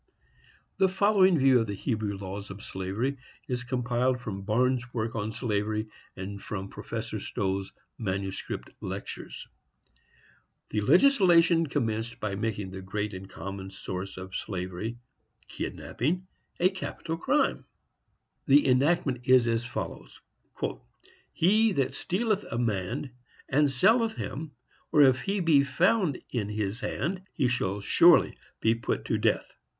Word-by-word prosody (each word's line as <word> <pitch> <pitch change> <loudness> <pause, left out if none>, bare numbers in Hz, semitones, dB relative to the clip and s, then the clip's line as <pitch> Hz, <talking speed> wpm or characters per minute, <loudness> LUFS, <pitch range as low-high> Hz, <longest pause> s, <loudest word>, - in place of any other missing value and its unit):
The 190 - +4
following 190 -2 +4
view 135 -2 +5
of 115 - 0
the 100 - -3
Hebrew 105 -2 -2
laws 100 +1 -6
of 95 +2 -9
slavery 100 +9 -2 0.3
is 125 -1 -2
compiled 125 +1 0
from 105 -5 -5
Barnes' 120 +4 +1
work 115 0 -2
on 110 0 -2
slavery, 110 -1 -1 0.3
and 100 +1 -6
from 95 -2 -5
Professor - - -5
Stowe's 95 0 -2 0.3
manuscript 95 -2 -4
lectures. - - -6 1.2
The 105 - 0
legislation 175 - +5
commenced 115 -4 -2
by 105 -2 -2
making 105 -2 -3
the 95 0 -7
great 105 +2 -3
and 95 +1 -8
common 95 0 -6
source 95 0 -6
of 95 0 -8
slavery—kidnapping—a 120 - -4
capital 170 -3 -5
crime. 295 - +1 0.8
The 140 0 +6
enactment 135 -1 +2
is 130 -2 +7
as 115 0 0
follows: - - -6 1.1
"He 215 +5 +3
that 135 -6 0
stealeth 210 +2 0
a 115 - -3
man 115 +4 -1 0.4
and 145 +1 +3
selleth 220 - +3
him, 150 0 -5 0.4
or 150 - +7
if 130 -1 +5
he 200 0 -1
be 155 -5 +5
found 175 - +2
in 105 -5 -2
his 105 +1 -2
hand, 175 +8 -2
he 130 - +1
shall 100 -5 -1
surely 100 - +5 0.3
be 115 - +4
put 115 -1 -2
to - - 0
death." - - 0
120 Hz, 130 wpm, -28 LUFS, 100-155 Hz, 1.2 s, is